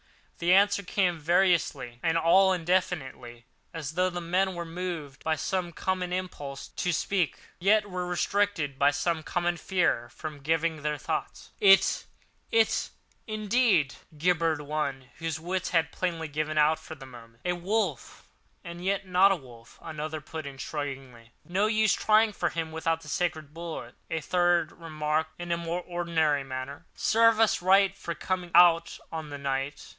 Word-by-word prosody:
The 175 +1 +2
answer 200 +2 +5
came 180 -3 0
variously 160 -7 +1
and 165 0 +1
all 185 +4 +5
indefinitely 160 -10 -2 0.3
as 155 -3 -4
though 180 +3 +1
the 175 -1 -4
men 180 +2 0
were 170 0 -4
moved 165 -5 -6
by 160 0 +1
some 175 +3 -2
common 185 +1 -2
impulse 145 -7 -5
to 180 - -2
speak, 180 0 0 0.2
yet 205 +3 +3
were 180 -2 -4
restrained 180 -6 0
by 140 - +5
some 160 +2 -1
common 175 +2 -1
fear 165 -11 0
from 155 +1 -8
giving 160 +1 0
their 150 0 -1
thoughts. - - -4
"It—it—indeed!" 215 - +1 0.2
gibbered 165 -2 +1
one, 140 -4 -3
whose 165 -2 -3
wits 180 +3 -2
had 165 -2 +1
plainly 165 -3 -2
given 155 +1 -3
out 155 +1 +4
for 160 - -9
the 140 -3 -11
moment. 115 -2 -14
"A 180 - +1
wolf—and 175 - -4
yet 195 +1 0
not 185 +2 +5
a - - +3
wolf!" 120 -6 -14
another 155 0 -5
put 155 -1 -7
in 135 -1 -8
shudderingly. 135 -5 -6 0.2
"No 190 +4 +1
use 215 -2 +3
trying 215 +1 +3
for - - 0
him 165 -1 -4
without 160 0 -1
the 155 - -13
sacred 160 -4 -2
bullet," 165 -7 -7 0.2
a 160 - -1
third 175 0 +2
remarked 155 -1 -2
in 175 0 -5
a 170 - +2
more 170 +1 -3
ordinary 165 -5 0
manner. 135 +4 -7
"Serve 230 0 +4
us 225 -4 +3
right 195 +1 +4
for 170 -4 -5
coming 180 +2 -3
out 170 -1 +6
on 160 -2 -5
this 145 -1 -7
night! 135 +1 -3
170 Hz, 155 wpm, -28 LUFS, 150-185 Hz, 0.3 s, out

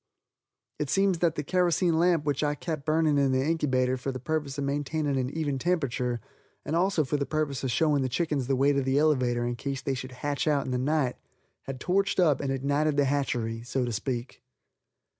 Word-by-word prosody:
It 150 - -2
seems 195 -1 +2
that 165 -2 +2
the 150 - -2
kerosene 175 0 +2
lamp 170 -3 +3
which 145 0 0
I 145 0 +1
kept 155 -1 -5
burning 155 -2 +3
in 135 -1 +3
the - - +3
inkybater 130 -5 +1
for 135 - -3
the 130 - -5
purpose 150 0 -2
of 140 - -2
maintaining 145 +1 -1
an 130 -1 0
even 145 -3 -2
temperature, 130 -7 0 0.5
and 155 - -1
also 175 -2 +2
for 145 +2 -1
the 140 - -1
purpose 145 -3 -2
of 130 - 0
showing 145 +3 +2
the 130 - 0
chickens 140 -1 -1
the 135 - +2
way 140 +2 +3
to 140 - +1
the 135 +1 +1
elevator 130 -6 +2
in 120 0 -2
case 135 +1 -4
they 135 - -1
should 130 0 -6
hatch 145 +3 -2
out 145 -2 +2
in - - -4
the 125 - 0
night, 140 -1 0 0.5
had 135 -1 -6
torched 195 +6 +1
up 155 -7 +3
and 140 -1 -1
ignited 145 +3 0
the 145 - +4
hatchery, 120 -5 -1
so 125 +2 -2
to 120 - -3
speak. 120 +3 -4
140 Hz, 215 wpm, -28 LUFS, 130-155 Hz, 0.5 s, the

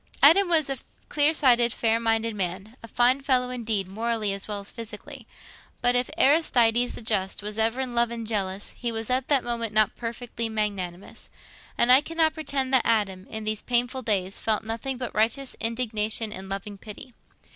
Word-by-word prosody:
Adam 340 +7 +7
was 325 -4 +3
a 270 -2 -3 0.3
clear 295 +1 +4
sighted, 245 -6 +4
fair 225 0 +1
minded 225 0 0
man—a 200 +5 -5
fine 245 +4 +2
fellow, 255 -2 +1
indeed, 220 -6 -2
morally 220 0 -2
as 195 0 -5
well 210 -1 -3
as 200 - -7
physically. 230 +3 -10 0.5
But 245 0 +2
if 245 0 +1
Aristides 245 -5 +3
the - - -9
Just 200 -2 -2
was 210 +1 -4
ever 225 +3 +1
in 255 -2 -4
love 235 0 +2
and 230 -1 -6
jealous, 200 -3 -3
he 240 -1 -3
was 225 +1 -3
at 255 +1 0
that 280 -4 +3
moment 230 -2 -3
not 215 -1 +3
perfectly 235 -1 -5
magnanimous. 200 -4 -4 0.5
And 240 +1 +4
I 260 +2 +9
cannot 320 0 +1
pretend 275 -4 -2
that 260 - +6
Adam, 195 -5 0
in 220 0 -6
these 215 0 -2
painful 245 +2 0
days, 195 -5 -1
felt 220 -1 0
nothing 230 +4 -4
but 250 -1 -5
righteous 235 +5 0
indignation 225 -2 -1
and 190 -1 -8
loving 200 +1 -6
pity. 220 +4 -11
230 Hz, 180 wpm, -25 LUFS, 210-250 Hz, 0.5 s, I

